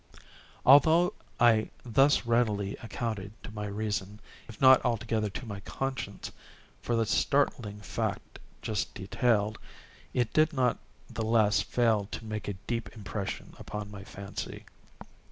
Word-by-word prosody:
Although 160 +6 +6 0.3
I 115 -2 +5 0.2
thus 135 +3 +4
readily 110 -4 +1
accounted 110 -3 -4
to - - -8
my 105 -1 -4
reason, 105 0 -3 0.3
if 110 - -11
not 130 -1 +7
altogether 110 -2 0
to 125 - -7
my 100 -3 -6
conscience, 135 +5 -4 0.5
for 120 - -1
the 115 -1 +2
startling 110 -4 +1
fact 105 - -4 0.2
just 105 -3 -2
detailed, 110 +1 +1 0.5
it 120 -3 0
did 155 +1 +4
not 125 -4 +1 0.3
the - - -5
less 110 -1 +3
fail 110 -4 +1
to 115 - -6
make 105 -1 -5
a 100 - -1
deep 115 -4 -2
impression 100 -2 -5
upon 105 -1 -6
my 100 -1 -8
fancy. 100 +1 -7
110 Hz, 135 wpm, -29 LUFS, 105-120 Hz, 0.5 s, not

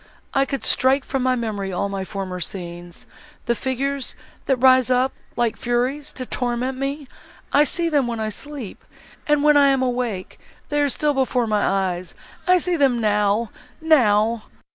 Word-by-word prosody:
could 275 -1 -3
I - - +2
strike 265 +1 +3
from 270 - -2
my 255 0 +2
memory 210 -5 -3
all 195 +1 -2
former 190 -2 -5
scenes—the 175 - -6
figures, 270 +2 -2 0.3
that 270 - +3
rise 255 0 +5
up, 255 +1 +2 0.2
like 235 -2 0
furies, 255 +5 -1
to 255 - -5
torment 250 +1 -2
me!—I 280 +1 -2
see 340 +2 +1
them, 290 -6 +2
when 235 -1 -3
I 215 0 -1
sleep, 270 -1 -7 0.4
and, 295 -1 +3
when 300 -1 +6
I 285 -1 +6
am 270 -1 +2
awake, 245 -7 -3 0.3
they 295 0 +1
are 290 - +2
still 295 +2 +1
before 260 -2 +1
my 210 -2 +1
eyes! 185 -2 -1 0.3
I 365 0 +6
see 355 0 0
them 265 -5 +3
now—now!" 220 +2 +1
250 Hz, 155 wpm, -22 LUFS, 215-275 Hz, 0.4 s, when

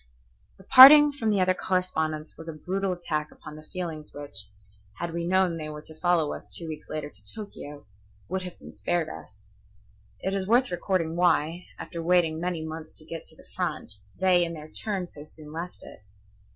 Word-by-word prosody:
The 190 - -16
parting 290 +6 +10
from 240 -6 -2
the 205 -2 +2
other 185 0 +4
correspondents 160 -5 -1
was 165 0 -9
a - - -4
brutal 190 +5 -2
attack 155 -4 -3
upon 150 - -11
the 155 - -10
feelings 165 -5 -5
which, 145 -8 -5 0.5
had 170 -1 -4
we 170 0 -2
known 185 -2 +2
they 155 -1 -5
were 150 0 -8
to 155 - -11
follow 175 -4 +2
us - - -9
two 165 - -3
weeks 155 -1 -8
later 150 -1 -4
to - - -13
Tokio, 150 -9 -9 0.4
would 190 +1 -2
have 180 -1 -8
been - - -12
spared 175 -2 -1
us. 100 -7 -12 0.7
It 190 - -1
is 195 -1 -1
worth 245 +2 +3
recording 175 -2 -1
why, 175 -1 +2
after 170 -2 -6
waiting 165 -2 +2
many 175 -3 -2
months 160 0 -7
to 155 - -11
get 165 0 -7
to - - -14
the - - -18
front, - - -2 0.3
they 185 -2 +4
in 170 0 -3
their 155 -1 -10
turn 195 -2 -2
so 145 -3 -12
soon 150 0 -12
left 170 +3 -7
it. - - -12
170 Hz, 195 wpm, -27 LUFS, 155-185 Hz, 0.7 s, parting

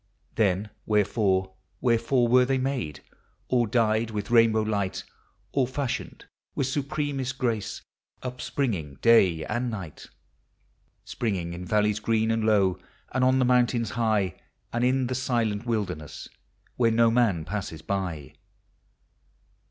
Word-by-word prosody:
Then 105 -1 +1 0.2
wherefore, 100 -3 +1 0.3
wherefore 120 +1 +2
were 125 +2 +5
they 135 +1 +1
made, 130 - -2 0.5
All 120 -2 +2
dyed 110 0 +1
with 105 +1 -4
rainbow 115 -2 +5
light, 100 -3 -2 0.5
All 135 -3 +1
fashioned 130 -1 -4 0.3
with 140 - 0
supremesl 135 -1 -2
grace, 115 -6 -2 0.4
Upspringing 125 - -3
day 95 -9 +5
and 120 +3 -2
night: 95 -9 -7 0.5
— - - -42
Springing 95 -7 -2
in 90 +1 -7
valleys 105 +2 +1
green 110 0 +1
and 115 -1 0
low. 100 -4 +3 0.3
And 130 0 0
on 130 +1 +4
the 130 - +3
mountains 120 -2 +2
high. 110 -6 0 0.3
And 120 +1 0
in 130 +1 +2
the 125 - -2
silent 120 -4 -1
wilderness 90 - -3 0.5
Where 115 -2 +4
no 115 0 +4
man 110 -10 +2
passes 90 -4 -5
by? 90 -8 -3
115 Hz, 130 wpm, -26 LUFS, 100-125 Hz, 0.5 s, were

